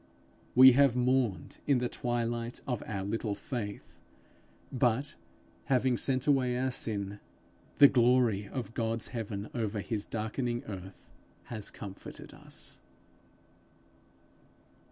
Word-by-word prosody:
We 130 +1 +10
have 135 -1 +4
mourned 125 -4 0
in 140 -3 +4
the 125 0 0
twilight 120 -1 -2
of 125 -5 -2
our 100 -3 -3
little 105 +1 -2
faith, 105 -1 -6 0.7
but, 125 +2 +1 0.5
having 130 -1 +2
sent 130 +1 0
away 130 -4 +2
our 130 +1 0
sin, 105 -4 -1 0.6
the 140 - +10
glory 120 -5 +3
of 120 -1 -5
God's 115 -1 0
heaven 105 -3 -5
over 110 -3 -2
his 105 0 -1
darkening 120 +3 -2
earth 95 -4 -9 0.3
has 110 -4 -3
comforted 100 -3 -9
us. - - -6
120 Hz, 115 wpm, -31 LUFS, 105-125 Hz, 0.7 s, We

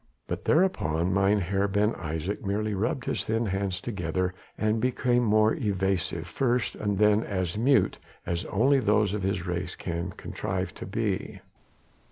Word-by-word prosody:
But - - -5
thereupon 95 - +2
Mynheer 100 0 +2
Ben 105 +2 +2
Isaje 80 +4 -4
merely 105 +1 -1
rubbed 115 +6 -1
his - - -1
thin 115 +1 0
hands 95 -2 -1
together 90 -4 -2 0.2
and 110 +1 +1
became 125 -2 +2
as 110 +1 +4
evasive 95 -4 0
first 120 +4 0
and 100 -2 -2
then 105 +1 +4
as 95 -4 -2
mute 130 +5 +3 0.3
as 85 0 -2
only 135 +7 +3
those 105 -4 +2
of 105 - -2
his 95 -1 -1
race 90 -1 -3
can 85 +1 -3
contrive 95 +1 -4
to - - -8
be. 105 -1 -2
100 Hz, 150 wpm, -27 LUFS, 95-110 Hz, 0.3 s, as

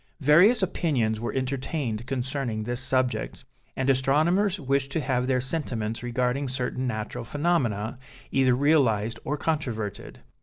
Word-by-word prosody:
Various 180 - +5
opinions 125 -12 0
were 120 - -3
entertained 130 -3 -3
concerning 130 -3 -2
this 120 +3 0
subject, 130 -1 -1 0.3
and 130 - -1
astronomers 155 +9 +2
wished 140 -1 0
to - - +1
have 130 -3 0
their 130 -1 +2
sentiments 125 -5 -3
regarding 125 +3 -1
certain 130 0 -2
natural 110 -2 -4
phenomena, 125 -7 -1 0.3
either 130 -2 +3
realized 125 -7 +2
or 150 - -2
controverted. 120 -11 -3
130 Hz, 125 wpm, -26 LUFS, 120-145 Hz, 0.3 s, Various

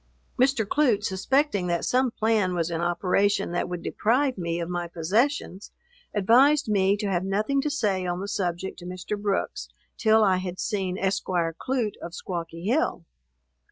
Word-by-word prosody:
Mr. 255 -3 +3
Clute, 235 -3 +2
suspecting 205 +1 +1
that 170 -1 0
some 255 0 +2
plan 215 -5 +1
was 170 -1 -1
in 165 0 -2
operation 180 +3 +1
that 175 0 -1
would 180 -1 -5
deprive 255 +4 +1
me 170 -2 -3
of 170 - -3
my 175 -1 -3
possessions, 195 - -1 0.4
advised 255 +9 +4
me 200 -1 +2
to 205 - -3
have 185 -3 0
nothing 215 +8 0
to 300 - -1
say 200 -10 0
on 175 0 -2
the 200 - -4
subject 185 -2 -3
to 175 - -10
Mr. 185 +3 -4
Brooks, 205 -1 -2 0.3
till 220 0 +4
I 190 -3 +3
had 185 0 -5
seen 190 -4 -2
Esquire 180 -3 0
Clute, 250 -3 -2
of 170 - -7
Squawky 170 -1 -6
Hill. 235 - 0
195 Hz, 165 wpm, -26 LUFS, 180-225 Hz, 0.4 s, advised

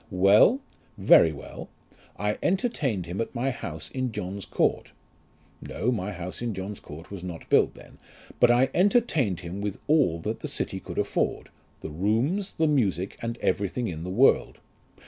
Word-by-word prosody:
"Well; 100 - +5 0.4
very 80 - +6
well. 70 - -9 0.5
I 105 +2 -1
entertained 150 - 0
him 90 +5 -3
at 115 - -5
my 130 +3 0
house 80 - -7
in 130 -2 -2
John's 100 -2 -5
Court. - - 0 0.7
(No, 125 - -2
my 105 -4 -2
house 90 +2 -7
in 115 -4 -2
John's 95 +2 -5
Court 80 +5 -11
was 95 -3 -7
not 90 -3 -7
built - - +4
then); - - -15 0.4
but 120 - +6
I 125 +2 +4
entertained 170 - +2
him 90 +3 -6
with 100 -2 -3
all 145 - +3
that - - -3
the - - -5
city - - -3
could - - -9
afford; - - -1 0.3
the 80 - -6
rooms, 115 - 0
the 160 - +2
music, 105 - +1
and 115 0 -3
everything 105 +4 0
in 80 -2 -6
the 90 - -5
world. 95 - +3
105 Hz, 165 wpm, -26 LUFS, 90-130 Hz, 0.7 s, very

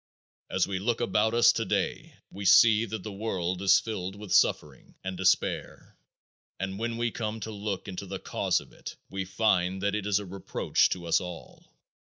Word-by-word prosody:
As - - +1
we 95 -2 -3
look 115 +4 -1
about 110 -1 +1
us 120 - +6
today - - -2 0.2
we 100 - -7
see 110 +3 +6
that 110 -3 -6
the 110 - -6
world 95 -3 -3
is 95 0 +6
filled 95 -4 -5
with 105 -1 -5
suffering 75 -3 +1
and 95 0 -4
despair 95 0 0 0.6
and 95 +1 -4
when 115 0 -2
we 120 0 0
come 110 0 -4
to 110 - -5
look 100 -2 -4
into 95 -2 -6
the - - -4
cause - - 0
of - - -17
it - - -9 0.2
we 95 0 -3
find 95 -1 +1
that 100 0 +1
it 105 -1 -2
is 100 -2 +3
a 105 - -4
reproach 95 +1 0
to 90 -2 -4
us 85 - +2
all. 90 -2 -10
100 Hz, 190 wpm, -28 LUFS, 95-110 Hz, 0.6 s, us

